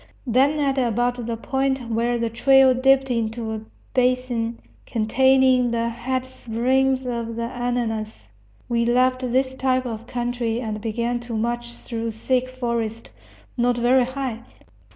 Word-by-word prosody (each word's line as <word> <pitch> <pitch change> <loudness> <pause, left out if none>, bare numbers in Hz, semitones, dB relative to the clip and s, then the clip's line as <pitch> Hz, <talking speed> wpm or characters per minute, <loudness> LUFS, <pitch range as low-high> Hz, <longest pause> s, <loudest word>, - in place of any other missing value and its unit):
Then, 270 +5 +3
at 275 -2 +1
about 245 0 0
the 230 -1 -2
point 265 -1 -1
where 235 +2 +1
the 230 -1 -1
trail 265 +2 +5
dipped 270 +1 +3
into 225 -1 -2
a 220 - -4 0.3
basin 250 -2 0 0.3
containing 255 +2 +3
the 230 0 0
head 255 +2 -3
springs 260 +2 0
of 235 -2 -3
the 235 - -3
Ananas, 230 - -3 0.4
we 235 -1 +1
left 255 +2 +2
this 260 +1 0
type 260 -1 0
of 230 -1 -6
country 240 -1 -2
and 215 -3 -4
began 235 +2 -1
to 240 -1 -6
march 240 +1 -2
through 230 -1 -5
thick 255 +3 0
forest, 235 -3 -3 0.5
not 245 0 +2
very 245 +1 +4
high. 260 -3 -4
245 Hz, 140 wpm, -23 LUFS, 230-255 Hz, 0.5 s, trail